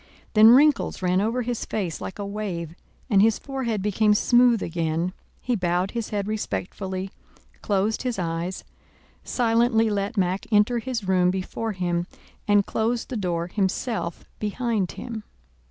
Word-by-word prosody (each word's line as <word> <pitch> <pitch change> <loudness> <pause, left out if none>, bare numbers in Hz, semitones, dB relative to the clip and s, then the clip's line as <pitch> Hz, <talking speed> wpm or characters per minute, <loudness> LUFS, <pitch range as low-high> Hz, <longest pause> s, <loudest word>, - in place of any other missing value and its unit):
Then 215 0 +8
wrinkles 275 -4 +4
ran 180 +1 +2
over 230 +4 0
his 240 -1 -3
face 185 -7 -3
like - - -6
a 205 - -4
wave 195 -6 -4 0.3
and 200 -6 +4
his 220 0 +4
forehead 240 -7 -3
became 210 +1 +3
smooth 240 0 +4
again, 165 +1 -1 0.3
he 245 - 0
bowed 180 -1 0
his 235 -2 -3
head 205 -1 -2
respectfully, 190 - -4 0.5
closed 205 +1 0
his 250 -4 -2
eyes, 170 +1 -3 0.6
silently 230 -2 +2
let 205 +2 -2
Mack 185 0 0
enter 215 +3 +3
his 235 -4 -4
room 180 -1 +3
before 190 +4 -3
him, 175 -2 -1 0.4
and 205 -1 +4
closed 230 +2 -1
the 255 - -4
door 175 -5 -1
himself 190 0 -2
behind 215 -2 -1
him. 230 -3 -6
205 Hz, 145 wpm, -24 LUFS, 185-230 Hz, 0.6 s, Then